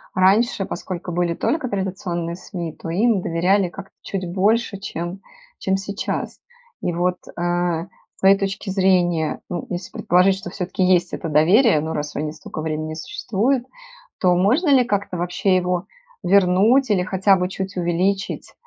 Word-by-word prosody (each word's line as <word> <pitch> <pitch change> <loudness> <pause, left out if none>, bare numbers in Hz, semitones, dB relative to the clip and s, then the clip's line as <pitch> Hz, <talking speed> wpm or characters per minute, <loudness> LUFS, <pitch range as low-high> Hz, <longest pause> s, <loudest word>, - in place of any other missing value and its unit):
раньше, 195 +2 +3
поскольку 180 0 -5
были 175 0 0
только 280 - -1
традиционные 180 -4 -3
СМИ, 175 -3 -6
то - - -8
им 205 +4 +2
доверяли 180 +3 +1
как-то 195 +2 -11
чуть 190 -2 -4
больше, 205 +3 +1
чем 185 -1 -5 0.4
чем 190 - 0
сейчас. 200 +1 -4 0.4
И 175 - -1
вот, 180 +1 0 0.2
а, 175 -1 0 0.3
с - - -26
твоей 195 +1 +6
точки 195 0 -3
зрения, 180 -4 +2
ну, 175 - -4
если 180 +1 -5
предположить, 185 +2 +3
что 190 -2 -8
всё-таки 185 0 -2
есть 180 -1 +3
это 165 - -4
доверие, 170 - +5
ну, 160 +1 -3
раз 150 0 -4
они 150 +1 -2
столько 155 0 -8
времени 155 0 -3
существуют, 245 - -1 0.5
то 180 -2 +3
можно 240 - +2
ли 265 -3 +6
как-то 200 -5 -2
вообще 180 +2 +1
его 180 +1 0 0.3
вернуть 200 +7 +4
или 195 -3 +3
хотя 190 +2 +3
бы 180 0 -1
чуть 195 0 -5
увеличить, 185 +3 -1
185 Hz, 155 wpm, -21 LUFS, 175-200 Hz, 0.5 s, твоей